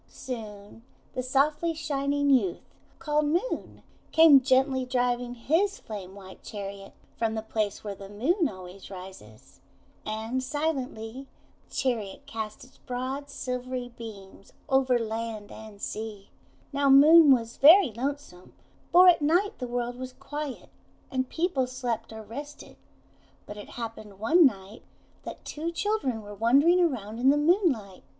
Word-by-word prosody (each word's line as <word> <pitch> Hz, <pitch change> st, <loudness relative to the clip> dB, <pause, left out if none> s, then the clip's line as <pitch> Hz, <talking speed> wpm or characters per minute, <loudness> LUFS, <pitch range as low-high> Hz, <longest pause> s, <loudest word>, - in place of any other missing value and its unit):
Soon 215 Hz, -4 st, -8 dB, 0.3 s
the 255 Hz, -, -2 dB
softly 295 Hz, +6 st, +1 dB
shining 285 Hz, -2 st, 0 dB
youth, 205 Hz, -10 st, +2 dB, 0.3 s
called 300 Hz, -2 st, 0 dB
Moon, 350 Hz, +11 st, -2 dB, 0.3 s
came 320 Hz, -4 st, +8 dB
gently 260 Hz, 0 st, +2 dB
driving 245 Hz, -1 st, -1 dB
his 330 Hz, -, +1 dB
flame 195 Hz, -3 st, -8 dB
white 190 Hz, -1 st, -12 dB
chariot 200 Hz, -1 st, -8 dB, 0.2 s
from 225 Hz, -1 st, -1 dB
the 220 Hz, -, -3 dB
place 215 Hz, -2 st, -2 dB
where 205 Hz, -2 st, -4 dB
the 195 Hz, 0 st, -11 dB
Moon 290 Hz, -, +1 dB
always 185 Hz, 0 st, -11 dB
rises. 185 Hz, -, -12 dB, 0.4 s
And 220 Hz, +4 st, -3 dB
silently 265 Hz, -4 st, -3 dB, 0.4 s
the -, -, -13 dB
chariot 240 Hz, -1 st, -2 dB
cast 220 Hz, -5 st, -6 dB
its 255 Hz, -, -19 dB
broad, 260 Hz, +3 st, -5 dB
silvery 250 Hz, 0 st, -4 dB
beams 210 Hz, -5 st, -12 dB
over 265 Hz, -3 st, +3 dB
land 225 Hz, -2 st, -4 dB
and 220 Hz, -2 st, -11 dB
sea. 210 Hz, -1 st, -6 dB, 0.4 s
Now 280 Hz, 0 st, +2 dB
Moon 300 Hz, +3 st, +8 dB
was 235 Hz, -3 st, +1 dB
very 320 Hz, -, +7 dB
lonesome, 245 Hz, -6 st, -6 dB, 0.4 s
for 365 Hz, +1 st, +8 dB
at 350 Hz, -3 st, +6 dB
night 360 Hz, +8 st, +1 dB
the 250 Hz, -, -4 dB
world 245 Hz, 0 st, -3 dB
was 255 Hz, 0 st, -6 dB
quiet, 290 Hz, -1 st, -7 dB, 0.4 s
and 260 Hz, -1 st, -1 dB
people 320 Hz, -7 st, 0 dB
slept 240 Hz, -3 st, -4 dB
or 220 Hz, 0 st, -8 dB
rested. 285 Hz, +7 st, -9 dB, 0.7 s
But 205 Hz, -, -8 dB
it 205 Hz, -, -10 dB
happened 220 Hz, -4 st, -7 dB
one 300 Hz, -, +5 dB
night 200 Hz, -2 st, -7 dB, 0.4 s
that -, -, -8 dB
two 320 Hz, +3 st, -4 dB
children 340 Hz, -, -1 dB
were 205 Hz, 0 st, -9 dB
wandering 275 Hz, -, +4 dB
around 230 Hz, -, -1 dB
in 260 Hz, +2 st, +4 dB
the 285 Hz, -, +4 dB
moonlight. 295 Hz, -, +1 dB
250 Hz, 140 wpm, -27 LUFS, 215-285 Hz, 0.7 s, came